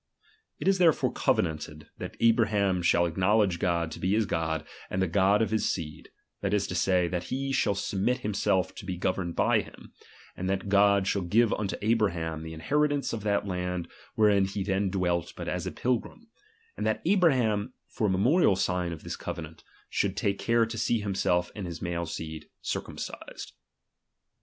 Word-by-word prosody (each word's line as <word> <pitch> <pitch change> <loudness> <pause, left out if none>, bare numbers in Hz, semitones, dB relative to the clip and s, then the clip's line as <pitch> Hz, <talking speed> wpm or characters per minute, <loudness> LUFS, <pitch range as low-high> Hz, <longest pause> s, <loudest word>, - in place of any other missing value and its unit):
It - - -4
is 195 -1 +4
therefore 165 -4 +4
covenanted, 75 -2 -1
that - - -7
Abraham 110 -5 +3
shall 85 0 +3
acknowledge 95 +1 +2
God 85 -3 0
to - - -7
be 95 +2 +1
his 110 0 +2
God 80 -3 -2 0.2
and 95 - -2
the 95 - +2
God 100 +4 +3
of 110 - -2
his 110 - +1
seed, 75 -4 -6 0.3
that - - +1
is 100 - +1
to - - -3
say, 90 0 +2
that 90 0 -3
he 135 +6 -2
shall 110 -6 +2
submit 100 +6 -1
himself 100 -3 0
to - - -8
be 90 -2 -3
governed 90 -1 -1
by - - +3
him; - - -14 0.4
and 95 +1 -3
that 95 +1 -2
God 100 -1 +4
shall 100 0 0
give 105 +6 +3
unto 100 -2 -2
Abraham 90 -8 0
the 80 0 -7
inheri 150 - +2
tance 140 -4 -2
of 115 - -3
that 100 -1 +1
land 90 -2 -3 0.3
ivherein 100 -3 +4
he 100 -1 -2
then 95 0 0
dwelt 90 -3 -1
but - - -6
as - - -2
a - - -2
pilgrim; 125 - -3 0.4
and - - -4
that - - 0
Abraham, 130 - +2
for 110 - -1
a - - +1
memorial 105 - +4
sign 90 -1 0
of 80 - -8
this - - -4
covenant, - - -7 0.2
should 100 -1 -1
take 100 -2 0
care 115 0 +3
to 115 0 -5
see 115 - +1
himself 95 -3 0
and 100 -4 -5
his 85 -2 -6
male 85 -1 -3
seed 80 -1 -6
circumcised. - - -6
95 Hz, 185 wpm, -28 LUFS, 90-110 Hz, 0.4 s, is